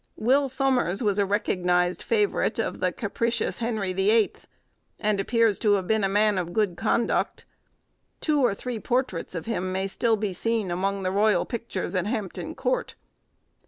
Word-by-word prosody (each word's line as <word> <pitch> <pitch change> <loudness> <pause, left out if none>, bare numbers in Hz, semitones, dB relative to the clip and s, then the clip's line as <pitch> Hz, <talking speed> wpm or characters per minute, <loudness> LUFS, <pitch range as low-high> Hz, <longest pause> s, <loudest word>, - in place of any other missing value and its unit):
Will 270 +5 +2
Somers 255 -7 +1
was 205 -1 +1
a 200 - +2
recognised 180 -3 +1
favourite 420 -3 +1
of - - -2
the - - +1
capricious 235 -2 -1
Henry 220 -5 -1
the 190 +2 +1
Eighth, 220 -1 +1 0.5
and 210 -1 +1
appears 225 0 +2
to 210 -2 +3
have 195 -2 +1
been 220 +1 +1
a 195 - +2
man 205 0 +3
of 175 -1 -4
good 205 -4 +1
conduct; 225 +5 0 0.7
two 300 -2 +1
or 220 -5 +3
three 245 +1 -5
portraits 240 -8 -2
of 165 - -4
him 185 -5 -2
may 190 +1 -1
be - - -1
still 215 -1 0
seen 220 0 -1
among 195 +2 -1
the 185 - 0
royal 210 +2 +3
pictures 235 -3 -4
at 185 0 0
Hampton 215 -5 -4
Court. - - -1
210 Hz, 170 wpm, -26 LUFS, 190-235 Hz, 0.7 s, to